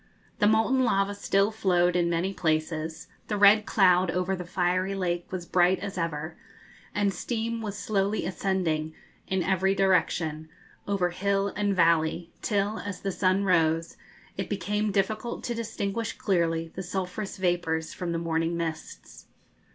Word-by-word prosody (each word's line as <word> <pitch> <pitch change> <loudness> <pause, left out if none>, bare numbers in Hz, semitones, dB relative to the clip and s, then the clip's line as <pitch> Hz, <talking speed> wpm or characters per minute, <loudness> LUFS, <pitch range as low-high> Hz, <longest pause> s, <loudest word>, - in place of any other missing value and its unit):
The 205 - +4
molten 225 +5 +3
lava 195 -4 +1
still 200 0 +1
flowed 180 -5 +2
in 175 -1 +2
many 170 +3 0
places, 160 -1 -1 0.2
the 210 - -1
red 205 +1 +6
cloud 185 -2 +4
over 180 +2 0
the 180 -1 -6
fiery 185 +2 0
lake 175 -2 -2
was 185 -2 -4
bright 180 +1 +3
as 200 0 -6
ever, 160 -2 -3 0.6
and 205 -1 +1
steam 230 +4 -3
was 205 -2 -5
slowly 205 0 0
ascending 170 -5 -1 0.3
in 190 -1 0
every 190 +1 +2
direction, 165 -4 +1 0.4
over 190 -3 +1
hill 200 +2 0
and 205 -1 -1
valley, 165 0 +2
till, 205 0 0
as 200 -2 -6
the 195 - -2
sun 185 +1 +1
rose, 165 -3 +2 0.4
it - - -3
became 205 +2 -1
difficult 215 +4 -1
to 240 - -2
distinguish 225 -1 -3
clearly 165 -3 0
the 190 - -5
sulphurous 190 +2 -4
vapours 175 -3 -1
from 175 -2 -4
the 170 - -1
morning 165 0 -1
mists. 160 -2 -6
185 Hz, 150 wpm, -27 LUFS, 170-200 Hz, 0.6 s, red